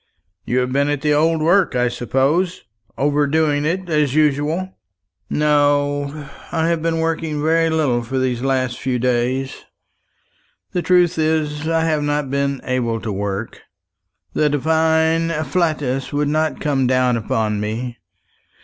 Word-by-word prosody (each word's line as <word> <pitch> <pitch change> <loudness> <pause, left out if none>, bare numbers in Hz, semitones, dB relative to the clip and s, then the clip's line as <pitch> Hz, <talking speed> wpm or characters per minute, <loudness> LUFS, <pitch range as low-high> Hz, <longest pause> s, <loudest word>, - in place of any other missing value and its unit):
"You 125 - -1
have 125 0 -2
been 140 +2 +1
at 145 -2 -1
the 150 0 +2
old 160 +1 +2
work, 175 -2 +3
I 125 0 +2
suppose 140 +10 0 0.3
overdoing 145 +1 +1
it, 180 +4 -1
as 150 -4 +1
usual!" 155 +5 +1 0.6
"No, 145 -1 +1 0.2
I 165 -1 +1
have 170 -1 0
been 165 0 0
working 160 -2 -1
very 165 +2 +2
little 145 -7 +1
for 120 +3 -4
these 125 -2 0
last 130 -2 -1
few 130 -1 -1
days. 125 +2 -1 1.1
The 180 - -1
truth 180 -1 +3
is, 155 -1 0
I 165 0 +1
have 155 -2 +1
not 145 -2 -1
been 140 -1 -1
able 120 -3 -1
to 110 -1 -4
work. 100 +2 -4 0.7
The 150 - +2
divine 160 +2 +2
afflatus 150 -4 -1
wouldn't 150 +2 0
come 135 -4 +1
down 130 -1 +2
upon 110 -1 -1
me. 115 +3 -4
145 Hz, 140 wpm, -19 LUFS, 130-160 Hz, 1.1 s, work